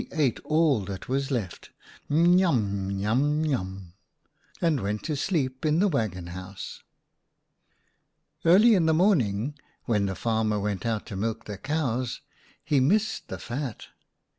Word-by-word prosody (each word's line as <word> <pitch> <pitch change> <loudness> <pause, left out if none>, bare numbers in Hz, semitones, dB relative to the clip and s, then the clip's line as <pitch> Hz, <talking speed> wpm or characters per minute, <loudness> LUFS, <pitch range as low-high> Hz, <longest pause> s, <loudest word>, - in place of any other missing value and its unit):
49 165 - -7
ate 135 -5 +2
all 155 -5 +3
that 95 0 -7
was 135 +2 -1
left 110 -10 -4 0.2
— - - -24
n 170 +4 +5
yum, 105 - +1
n 100 - -2
yum, 140 +9 +1
n - - 0
yum 95 - -3 0.3
— - - -31
and 165 -5 +2
went 105 0 -3
to 155 - -2
sleep 135 -5 -1
in 155 0 +2
the 200 +4 +4
waggon 110 - -1
house. 95 +3 -8 1.6
11 175 +5 +6
Early 235 -1 +7
in 180 -5 +3
the 160 - +4
morning, 140 - +2 0.3
when 105 -4 +1
the 95 - -3
farmer 110 -1 0
went 100 +1 -2
out 110 -2 -1
to - - -7
milk 110 +3 -3
the 105 -2 -7
cows, 130 -5 -2 0.4
he 145 - +3
missed 205 +11 +1
the - - -5
fat. 125 -2 -5
125 Hz, 165 wpm, -27 LUFS, 100-155 Hz, 1.6 s, Early